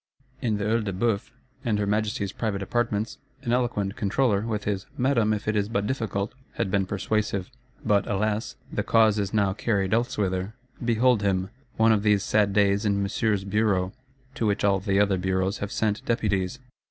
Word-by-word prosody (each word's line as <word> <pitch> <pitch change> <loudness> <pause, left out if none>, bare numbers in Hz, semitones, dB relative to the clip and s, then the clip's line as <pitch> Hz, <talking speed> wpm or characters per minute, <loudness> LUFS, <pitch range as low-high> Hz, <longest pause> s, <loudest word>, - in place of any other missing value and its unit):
In 110 -4 0
the 100 - -3
Œil 115 +1 +1
de 100 -2 -3
Bœuf, 100 +1 0 0.3
and 115 -5 +1
her 105 - 0
Majesty's 105 0 -1
private 100 -4 -2
Apartments, 110 0 -1 0.2
an 120 -3 0
eloquent 120 -6 0
Controller, 105 0 +1
with 110 -1 -2
his 100 -2 -2
'Madame, 125 -4 +2
if 105 0 -2
it 105 - +1
is 105 0 0
but 100 -3 0
difficult,' 110 -4 -2 0.2
had 105 -5 -2
been 95 -1 +1
persuasive: 100 0 -1 0.3
but, 100 -1 +2
alas, 105 +2 -1 0.2
the - - 0
cause 110 -2 +4
is 100 -1 -1
now 100 -3 +2
carried 100 -2 0
elsewhither. 105 -4 0 0.3
Behold 120 0 +3
him, 95 -1 0 0.3
one 115 0 +5
of 110 -2 +3
these 105 -1 +3
sad 105 -1 +2
days, 100 +1 +3
in 100 -1 +1
Monsieur's 100 0 0
Bureau; 100 -2 +1 0.4
to 115 -6 -1
which 100 0 0
all 100 -1 +3
the 100 0 +1
other 100 -2 +3
Bureaus 95 +1 0
have 100 0 -4
sent 105 -1 0
deputies. 100 -3 0
105 Hz, 180 wpm, -26 LUFS, 100-110 Hz, 0.4 s, one